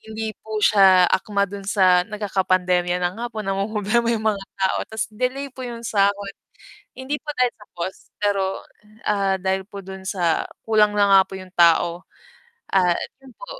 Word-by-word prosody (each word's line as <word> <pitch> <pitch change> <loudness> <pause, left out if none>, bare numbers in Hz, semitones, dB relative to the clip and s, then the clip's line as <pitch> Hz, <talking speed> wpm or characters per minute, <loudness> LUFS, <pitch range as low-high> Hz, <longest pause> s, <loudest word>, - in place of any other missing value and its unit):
hindi 220 0 -5
po 220 0 -6
siya 190 -3 +6
akma 200 +1 +1
dun 200 +1 -8
sa 185 -3 +4
nagkakapandemya 185 -4 0
na 175 - 0
nga 240 +1 -3
po, 215 - -4
namomroblema 210 +4 0
'yung 220 -1 -2
mga 195 -1 -7
tao 190 -1 +1
ta's 220 0 -2
delay 255 +5 -2
po 260 - -12
'yung 235 -1 -6
sahod. 200 -1 0 0.6
Hindi 260 +3 -3
po - - -38
dahil 250 -1 +2
sa 210 - -15
cost, 175 +2 -5 0.2
pero, 200 -1 +2 0.6
ah, 195 -2 +1
dahil 190 +1 -1
po 200 -1 -9
dun 190 0 -9
sa 175 -5 0 0.2
kulang 210 -1 +3
na 205 -1 +4
nga 195 - +8
po 190 - -9
'yung 185 -1 -12
tao 170 +1 +3 0.7
at 180 -3 +2 0.2
'yun 265 -2 -15
po, - - -10
200 Hz, 170 wpm, -22 LUFS, 190-220 Hz, 0.7 s, nga